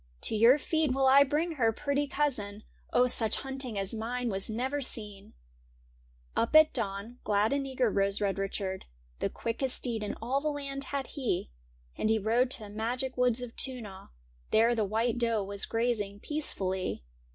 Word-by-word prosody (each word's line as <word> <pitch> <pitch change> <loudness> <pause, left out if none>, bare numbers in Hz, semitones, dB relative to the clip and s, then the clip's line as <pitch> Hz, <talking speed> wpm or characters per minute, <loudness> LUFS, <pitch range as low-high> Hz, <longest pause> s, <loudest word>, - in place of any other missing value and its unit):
To - - +3
your 230 +6 +6
feet 310 -1 0
will 270 0 +2
I 270 +2 +8
bring 305 +3 -1
her, 225 -3 +3
pretty 285 +4 -1
cousin; 215 -8 -1 0.3
Oh, 245 - +4
such 225 -3 +2
hunting 265 -5 -3
as 195 +1 0
mine 240 +2 -2
was 195 0 -3
never 260 +6 -2
seen! 210 -6 -4 0.5
' - - -33
Up 230 +6 0
at 310 0 +7
dawn, 220 +1 -4
glad 210 +3 +2
and 280 -1 -1
eager, 255 -4 +1
rose 195 0 +1
Red 200 -1 0
Richard; 195 -1 -3 0.3
The - - 0
quickest 250 +3 -2
steed 235 -3 -2
in 210 - -3
all 255 +5 -1
the 305 - -2
land 275 -1 -4
had 275 0 -3
he. 240 - -2 0.5
And 215 - +1
he 220 - +4
rode 230 +4 +2
to 250 - +1
the 205 - -9
magic 245 +5 -2
woods 250 -1 +2
of 240 -1 -8
Toonagh 230 -8 -2 0.2
— - - -33
There 230 +2 +4
the 220 -3 +1
white 225 +4 0
doe 230 -3 +1
was 200 0 -1
grazing 225 -4 -1
peacefully. 190 - -2
230 Hz, 185 wpm, -30 LUFS, 205-265 Hz, 0.5 s, I